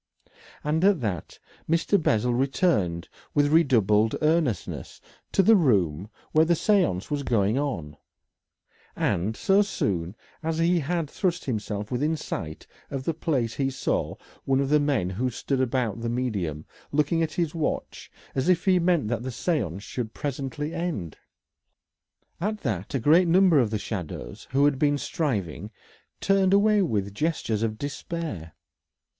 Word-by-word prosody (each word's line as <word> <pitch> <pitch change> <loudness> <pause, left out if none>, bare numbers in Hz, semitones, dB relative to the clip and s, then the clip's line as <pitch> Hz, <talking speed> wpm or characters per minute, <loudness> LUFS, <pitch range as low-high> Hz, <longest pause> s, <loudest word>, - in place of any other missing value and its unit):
And 155 +3 0
at 195 -3 +4
that 95 -8 -4 0.3
Mr. 165 +4 +2
Bessel 120 -3 +2
returned 120 - +1 0.3
with 145 0 +3
redoubled 110 - +4
earnestness 155 -7 0 0.3
to 195 - +3
the 225 +4 +6
room 100 - +2 0.2
where 155 - +5
the 170 +1 +3
séance 175 - +1
was 145 -1 0
going 115 -2 +1
on, 85 - -3 1.0
and 105 +6 0
so 195 +1 +4
soon 95 - -2 0.3
as 160 0 -2
he 170 +1 +3
had 165 +1 -1
thrust 175 +3 -2
himself 105 -4 -3
within 150 +6 0
sight 80 - -6 0.2
of 135 -2 -4
the 165 - -1
place 135 -8 -1
he 135 -1 0
saw 135 - -2 0.3
one 135 0 +2
of 140 -1 0
the 150 +1 +5
men 140 -11 0
who 125 +7 -1
stood 130 +2 -2
about 120 -3 -1
the 115 - -2
medium 100 -12 -2 0.3
looking 150 +3 +1
at 160 -2 -1
his 165 -1 -1
watch 160 -3 -3 0.2
as 130 +5 0
if 180 +1 +3
he 185 -2 +4
meant 170 -7 +2
that 115 0 -1
the 130 - -4
séance 115 - -2
should 110 +1 -5
presently 145 +2 -4
end. 160 - -3 1.2
At 210 +4 -2
that 105 - -3
a - - +1
great 160 +9 +5
number 175 -2 +5
of 120 -5 +2
the 110 - -1
shadows 90 - -6
who 140 +2 +3
had 145 -2 +2
been 145 -1 +3
striving 105 - -2 0.5
turned 195 -1 +3
away 210 +1 +4
with 100 - -1
gestures 115 -5 -1
of 110 -1 -1
despair. 145 - -5
135 Hz, 150 wpm, -26 LUFS, 105-165 Hz, 1.2 s, the